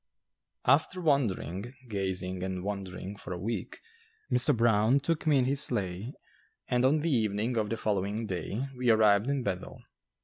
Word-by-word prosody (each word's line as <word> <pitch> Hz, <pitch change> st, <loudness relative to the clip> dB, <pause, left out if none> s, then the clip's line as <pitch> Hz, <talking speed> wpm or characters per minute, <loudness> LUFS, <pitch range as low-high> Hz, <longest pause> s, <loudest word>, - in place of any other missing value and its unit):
After 155 Hz, +7 st, +3 dB
wandering, 120 Hz, -, 0 dB
gazing 95 Hz, -3 st, -2 dB
and 95 Hz, -1 st, -3 dB
wondering, 100 Hz, -1 st, -5 dB
for 90 Hz, -, -6 dB
a -, -, -4 dB
week, 105 Hz, 0 st, -4 dB, 0.5 s
Mr. 125 Hz, -1 st, +3 dB
Brown 115 Hz, +3 st, +4 dB
took 160 Hz, +2 st, -2 dB
me 150 Hz, -2 st, +5 dB
in 130 Hz, -, +3 dB
his 140 Hz, +2 st, +2 dB
sleigh 105 Hz, -2 st, -2 dB, 0.5 s
and 125 Hz, 0 st, +1 dB
on 145 Hz, +4 st, +3 dB
the 165 Hz, +1 st, 0 dB
evening 110 Hz, -1 st, 0 dB
of 110 Hz, -2 st, 0 dB
the 115 Hz, -, -2 dB
following 105 Hz, +1 st, -1 dB
day 100 Hz, +5 st, -3 dB
we 125 Hz, -1 st, 0 dB
arrived 110 Hz, +1 st, +4 dB
in 140 Hz, -2 st, 0 dB
Bethel. 95 Hz, -4 st, -4 dB
110 Hz, 160 wpm, -29 LUFS, 100-130 Hz, 0.5 s, me